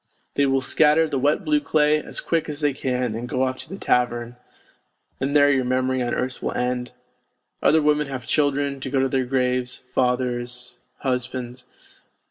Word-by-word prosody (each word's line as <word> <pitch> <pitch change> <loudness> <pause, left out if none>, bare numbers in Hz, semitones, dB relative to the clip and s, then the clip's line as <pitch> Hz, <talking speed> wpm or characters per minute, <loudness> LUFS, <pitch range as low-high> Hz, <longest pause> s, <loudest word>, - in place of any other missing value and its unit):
They 140 -1 +2
will 135 0 +2
scatter 155 +4 +3
the 140 -3 -1
wet 145 +3 +1
blue 305 -1 +3
clay 150 - +2
as - - -6
quick 165 -2 -1
as 150 0 -5
they 145 -2 +2
can 125 -3 -1
and 120 +2 -5
go 130 - 0
off 130 0 -1
to - - -8
the 195 - -6
tavern... 120 -5 0 0.8
and 140 +2 -1
there 145 -1 +6
your 135 -2 +2
memory 130 +1 0
on 120 -1 -1
earth 130 0 -3
will - - -2
end; 125 0 -2 0.7
other 155 0 +4
women 150 0 +2
have 130 -3 -6
children 140 -1 0
to 135 - -5
go 135 0 +1
to 135 - +2
their 130 -1 0
graves, 125 -1 -1
fathers, 125 0 -1 0.2
husbands. 125 -1 -3
130 Hz, 180 wpm, -23 LUFS, 125-145 Hz, 0.8 s, there